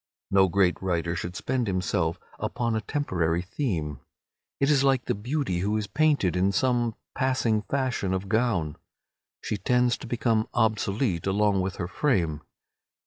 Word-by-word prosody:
No 95 -1 +5
great 95 -1 +2
writer 85 -2 -1
should 85 +1 -4
spend 125 +1 -1
himself 90 -2 0 0.2
upon 115 -2 -1
a 110 - 0
temporary 90 - -1
theme. 90 - -3 0.6
It 140 +2 +3
is 140 -2 +4
like 135 -2 +2
the - - 0
beauty 120 - -2
who 105 +4 0
is 105 - -2
painted 135 - +2
in 95 +2 +2
some 120 -1 +1 0.2
passing 130 -5 +1
fashion 130 -6 -1
of 95 +1 -2
gown. 105 -9 0 0.7
She 105 - -2
tends 125 +3 +2
to - - -8
become 115 -2 +1
obsolete 105 - +1
along 100 0 +2
with 95 +1 -2
her 85 - -3
frame. 90 - 0
105 Hz, 150 wpm, -26 LUFS, 90-125 Hz, 0.7 s, No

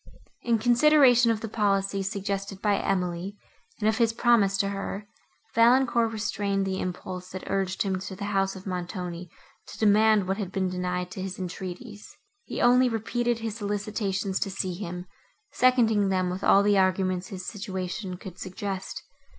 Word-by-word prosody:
In 235 -1 +2
consideration 245 0 +5
of 220 -1 0
the 225 - -4
policy, 200 -2 0
suggested 195 0 -3
by 205 0 +1
Emily, 185 +1 -2 0.4
and 210 - +1
of 220 +1 +1
his 230 -1 +3
promise 225 -5 +3
to 195 0 +1
her, 200 +1 -5 0.5
Valancourt 235 0 +4
restrained 200 -2 -1
the 190 0 -2
impulse, 180 0 -5
that 185 0 -7
urged 190 -1 -1
him 190 -2 -1
to 190 +1 -7
the 200 +2 -5
house 195 0 +1
of 190 - -10
Montoni, 180 -1 -5 0.4
to - - -10
demand 215 -1 +4
what 190 +1 0
had 195 -4 -4
been 190 -1 0
denied 180 0 -3
to 190 - -6
his 190 -1 -5
entreaties. 190 +4 -7 0.3
He - - -5
only 250 +1 +5
repeated 235 +1 -1
his 225 -1 -4
solicitations 205 -2 -2
to - - -1
see 190 -1 -2
him; 180 -1 -6 0.5
seconding 225 -6 +3
them 185 -1 +1
with 185 +2 -5
all 200 - +6
the 205 -1 +4
arguments 185 -1 +1
his 185 -1 -7
situation 190 -2 -4
could 185 0 -10
suggest. 190 0 -5
195 Hz, 165 wpm, -27 LUFS, 185-220 Hz, 0.5 s, all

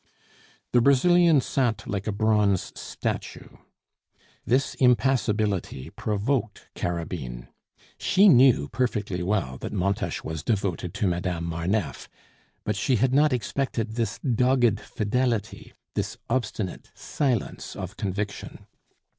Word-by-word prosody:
The 120 - +4
Brazilian 160 +4 +5
sat 125 -3 -1
like 100 -1 -3
a - - +1
bronze 105 -2 +2
statue. - - -5 0.9
This 130 +4 +1
impassibility 110 - +1
provoked 110 +2 -2
Carabine. 70 -8 -4 0.5
She 195 +2 +4
knew 125 - +6
perfectly 105 -7 -1
well 90 -9 -1
that - - -5
Montes 100 0 -1
was 80 -1 -4
devoted 95 -4 -2
to 105 - 0
Madame 90 -1 -1
Marneffe, 85 +4 -2 0.5
but 105 - -1
she 115 +6 +1
had 125 +3 +2
not 150 +2 +4
expected 120 -1 -2
this 115 -2 -2
dogged 125 -4 +2
fidelity, 115 +1 -2 0.2
this - - -3
obstinate 110 -6 -2
silence 130 -7 -2
of - - -6
conviction. 100 +1 -4
110 Hz, 110 wpm, -26 LUFS, 95-125 Hz, 0.9 s, knew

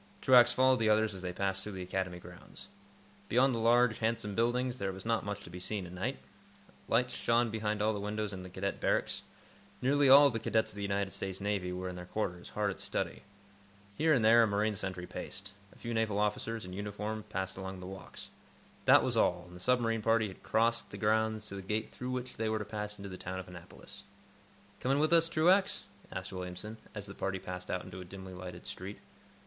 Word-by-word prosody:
Truax 120 -2 +7
followed 130 0 +4
the 110 -1 +3
others 110 0 +3
as 95 - -7
they 90 -1 -3
passed 95 +1 -1
through 105 +1 -6
the 95 -1 -5
Academy 90 -1 -2
grounds. 90 0 -10 0.6
Beyond 130 +3 +4
the 115 - -1
large, 120 0 +4
handsome 110 -2 -1
buildings, 120 +3 +1
there 95 -1 -1
was 95 +1 -8
not 115 -1 +1
much 100 0 -4
to - - -11
be 90 - -7
seen 100 +1 -3
at 90 - -9
night. 90 0 -2 0.7
Lights 125 +2 +2
shone 115 0 +2
behind 105 -1 -1
all 110 +1 +3
the 105 - -3
windows 105 0 -2
in 95 -1 -7
Cadet 95 +2 -3
Barracks. - - +1 0.6
Nearly 140 +2 +4
all 140 +2 +10
of 140 - +4
the 115 - -1
cadets 110 0 +1
of - - -11
the - - -4
United 100 -1 -1
States 95 -1 -4
Navy 100 -3 -1
were 90 +1 -4
in 90 -1 -5
their 90 0 -8
quarters, 90 -4 -3
hard 105 -1 0
at - - -8
study. - - -2 0.7
Here 160 +5 +3
and 125 -7 +4
there 115 +1 +8
a 115 - +5
marine 105 +1 +1
sentry 95 -2 -4
paced. 100 +2 -5 0.2
A - - -19
few 120 -1 -5
naval 110 -3 +1
officers, 105 +1 -1
in 90 - -8
uniform, 105 +2 -4
passed 95 -2 -3
along 95 0 -6
the 90 - -8
walks. 95 +1 -9 0.5
That - - +7
was - - 0
all, 90 - +2
and 90 0 -13
the - - -10
submarine 115 +1 +2
party 115 -1 +2
had 95 - -12
crossed 115 +1 +1
the - - -8
grounds 110 0 +1
to 100 - -6
the 100 - -5
gate 105 +3 -2
through 125 - -6
which 125 0 -4
they 110 0 0
were 110 - +1
to 105 - -4
pass 105 0 -5
into 100 0 -7
the 95 - -7
town 95 +1 -4
of 95 - -6
Annapolis. 90 -1 -11 0.8
"Coming 135 +2 +1
with 155 +3 +3
us, 165 0 +5
Truax?" 180 +5 +3 0.3
asked 95 +1 -5
Williamson, 90 +4 -6 0.2
as 105 -1 -5
the 100 - -8
party 95 0 -2
passed 90 0 -7
out 90 - -1
into 90 0 -8
a - - -6
dimly 95 +1 -9
lighted 90 -1 -8
street. 95 +3 -6
105 Hz, 220 wpm, -32 LUFS, 95-115 Hz, 0.8 s, all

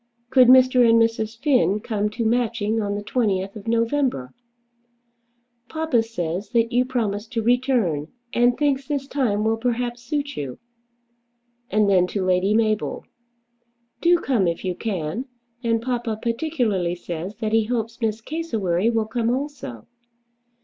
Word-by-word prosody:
Could 260 -2 +6
Mr. 255 0 +6
and 230 0 +6
Mrs. 225 -1 0
Finn 245 -8 +2
come 210 -1 -1
to 230 +2 -3
Matching 225 -2 0
on 205 -1 -2
the 205 - -4
20th 200 -4 -1
of 215 +1 -10
November? 230 - 0 1.4
"Papa 315 -7 +1
says 190 -4 -4
that 230 0 +2
you 250 +1 +2
promised 220 -4 -2
to 225 -2 -1
return, 235 - +1 0.3
and 240 +1 +3
thinks 275 -1 0
this 285 -2 -2
time 235 -8 0
will 220 +1 +1
perhaps 240 0 -2
suit 285 +2 -3
you." 135 -4 -5 1.1
And 210 0 +2
then 185 -2 +4
to 190 0 -2
Lady 185 +3 +2
Mabel: 215 -2 0 1.0
"Do 345 +1 +5
come 245 - +1
if 170 +2 -2
you 185 - 0
can; 190 - -3 0.4
and 230 -1 +1
papa 240 -3 -2
particularly 230 - -1
says 175 +3 -6
that 220 0 -3
he 225 -1 +3
hopes 230 0 -3
Miss 220 -1 -1
Cassewary 225 - -1
will 225 -2 +1
come 225 +1 -1
also." 255 - -4
225 Hz, 145 wpm, -23 LUFS, 205-250 Hz, 1.4 s, Could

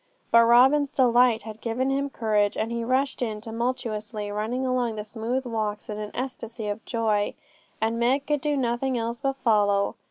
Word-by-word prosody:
But 230 0 +7
Robin's 265 +5 +5
delight 245 -4 +4
had 220 0 -9
given 250 +3 -1
him 280 +1 0
courage, 210 -4 0
and 225 +2 -1
he 235 0 -2
rushed 260 +3 0
in 220 -3 -2
tumultuously, 225 -2 -3
running 225 +5 -2
along 250 -3 0
the 210 -1 -5
smooth 235 +4 -3
walks 215 -3 -3
in 210 - -5
an 210 -1 -5
ecstasy 235 -3 -5
of 205 +2 -4
joy; 215 -3 0 0.4
and 225 +1 0
Meg 260 +4 +2
could 295 -1 0
do 295 -1 0
nothing 250 +1 0
else 230 +1 -3
but 270 -1 -1
follow. 205 -6 +2
235 Hz, 180 wpm, -25 LUFS, 215-255 Hz, 0.4 s, But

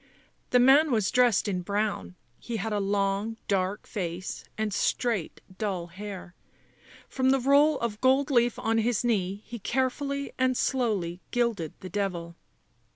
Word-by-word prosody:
The 250 - +4
man 270 +5 +6
was 215 -6 +1
dressed 245 -5 +3
in 185 -3 -1
brown; 200 - -2 0.2
he 235 -2 -4
had 220 +1 -3
a 205 - +1
long 200 +2 0
dark 195 +1 0
face 180 -1 -5
and 215 -2 -1
straight 225 -3 -1 0.2
dull 190 -5 -2
hair; 195 -3 -8 0.7
from 260 0 +1
the 270 0 +4
roll 280 +3 +4
of 225 -2 -3
gold 265 +3 +3
leaf 240 -2 +3
on 225 0 +1
his 230 0 +1
knee 200 -3 0
he 235 0 -7
carefully 275 +4 -1
and 255 -1 +2
slowly 200 -9 0
gilded 230 -10 -1
the 185 - -7
devil. 175 -3 -3
215 Hz, 150 wpm, -27 LUFS, 195-250 Hz, 0.7 s, man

